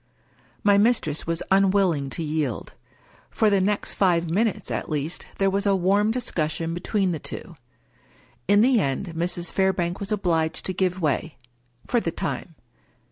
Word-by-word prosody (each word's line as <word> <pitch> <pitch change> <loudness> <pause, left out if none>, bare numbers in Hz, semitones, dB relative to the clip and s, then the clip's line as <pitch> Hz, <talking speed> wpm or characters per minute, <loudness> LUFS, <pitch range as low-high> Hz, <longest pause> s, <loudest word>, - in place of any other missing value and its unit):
My 200 -1 +5
mistress 205 -10 +1
was 165 0 -1
unwilling 190 -7 +3
to 165 - -4
yield. 150 -6 -2 0.6
For 215 -2 +2
the 200 -1 +3
next 205 +2 -1
five 175 -3 +2
minutes, 215 +3 0
at - - -3
least, 150 +2 -3
there 195 -1 +2
was 200 +1 0
a 200 - +4
warm 195 +3 +2
discussion 165 -8 -2
between 190 +2 0
the 160 - -3
two. 170 - -7 0.9
In 205 +1 +5
the 250 0 +4
end 165 +3 -2
Mrs. 175 +1 -2
Fairbank 185 -2 +1
was 200 +1 -5
obliged 165 -6 0
to 185 - -2
give 185 0 0
way 155 +1 -1 0.2
— 120 0 -31
for 240 - +2
the 170 - -2
time. 165 0 -4
180 Hz, 160 wpm, -24 LUFS, 160-200 Hz, 0.9 s, My